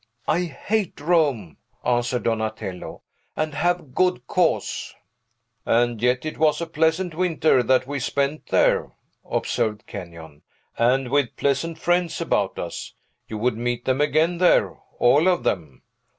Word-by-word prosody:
I 175 +3 +1
hate 195 +6 -2
Rome," 145 - +1 0.3
answered 120 0 0
Donatello; 110 -5 -3 0.3
"and 155 -1 -2
have 175 -4 -1
good 180 +4 +1
cause." 180 -4 0 0.7
"And 120 -1 +1
yet 125 +3 +1
it 155 - -5
was 155 -1 +3
a 170 - -2
pleasant 160 +3 0
winter 160 -5 +2
that 130 +2 +2
we 140 +1 -4
spent 140 +3 -1
there," - - +2 0.3
observed 105 -1 -2
Kenyon, 85 -6 -10 0.3
"and 125 +2 +2
with 140 -4 +1
pleasant 140 +4 -1
friends 175 0 0
about 105 - 0
us. 85 - -6 0.3
You 110 - -5
would 115 +1 0
meet 120 0 -2
them 130 +2 +1
again 155 +4 +2
there 180 - +4 0.2
all 145 +8 +4
of 180 -2 +2
them." 80 -8 -3
140 Hz, 135 wpm, -23 LUFS, 115-165 Hz, 0.7 s, there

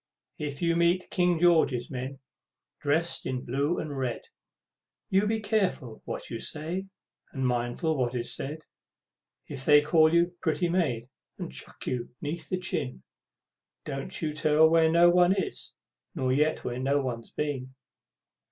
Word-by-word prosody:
If 145 0 -4
you 170 0 +3
meet 170 +2 +2
King 180 -2 +2
George's 160 -8 +3
men, 130 +1 -5 0.6
dressed 160 +4 0
in 130 -1 -3
blue 140 +7 0
and 150 -2 -4
red, 130 -3 -2 0.9
You 195 +2 +3
be 220 +1 0
carefull 195 - -1
what - - -5
you 115 - -3
say, 165 +9 -4 0.4
and 135 -3 -2
mindful 125 +6 0
what 125 -2 -1
is 120 -1 -2
said. 155 +3 -6 0.8
If 130 - -6
they 150 +1 +7
call 155 +1 +4
you 170 +1 +3
"pretty 170 +1 +1
maid," 145 -10 0 0.3
and - - -6
chuck 65 - -8
you 125 -2 -2
'neath 160 +3 -5
the 185 - 0
chin, 65 - -3 0.8
Don't 135 -2 -4
you 155 -1 -1
tell 155 +1 +5
where 160 0 +4
no 170 +1 +6
one 180 +1 +5
is, 190 - -4 0.4
nor 130 -4 +1
yet 150 +3 +1
where 125 0 -3
no 140 +2 +2
one's 120 -4 -4
been! 130 -3 -4
150 Hz, 150 wpm, -28 LUFS, 130-170 Hz, 0.9 s, they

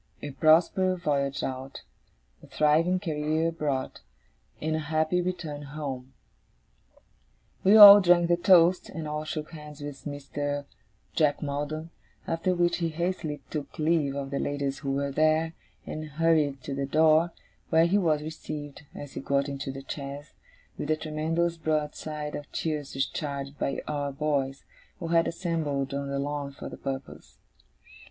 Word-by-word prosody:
'A 145 - -4
prosperous 170 +5 +3
voyage 140 -3 0
out, 130 +1 -5 0.6
a - - -15
thriving 160 +5 +2
career 160 -2 0
abroad, 145 -5 -3 0.6
and 155 +1 -1
a - - -1
happy 155 +3 0
return 175 -5 -4
home!' 135 -3 -6 1.5
We 200 +3 +7
all 205 -1 +12
drank 175 -1 +4
the 175 - +4
toast, 175 0 +5
and 160 -2 -6
all 150 +1 -3
shook 155 0 -5
hands 150 -2 -10
with 145 -2 -8
Mr. 145 0 -4 0.5
Jack 150 -2 +2
Maldon; 150 +3 -4 0.4
after 165 +3 0
which 175 0 +2
he 170 -2 -1
hastily 160 -2 -3
took 150 -3 -5
leave 155 -3 +1
of 140 -1 -4
the 140 - -1
ladies 140 -1 -2
who 135 -2 -2
were 140 0 -1
there, 155 +2 +2 0.3
and 155 - -5
hurried 150 -3 +1
to 140 - -4
the 140 0 -2
door, 160 +3 +4 0.4
where 160 +1 +5
he 195 +4 +3
was 155 -5 +1
received, 150 -2 -7
as 145 -1 -8
he - - -5
got 140 0 0
into 140 -1 -4
the 135 0 -9
chaise, 140 +1 -7 0.5
with 150 - -4
a 155 - +3
tremendous 160 +2 -1
broadside 150 -1 -3
of 145 - -7
cheers 150 -4 -3
discharged 140 0 -3
by 140 - -2
our 145 -1 -2
boys, 140 -2 -1 0.3
who 165 - -5
had 165 0 +3
assembled 160 -6 -2
on 140 0 -3
the 140 - -2
lawn 140 0 -3
for 140 - -8
the - - -9
purpose. 135 - -7
150 Hz, 155 wpm, -27 LUFS, 140-165 Hz, 1.5 s, all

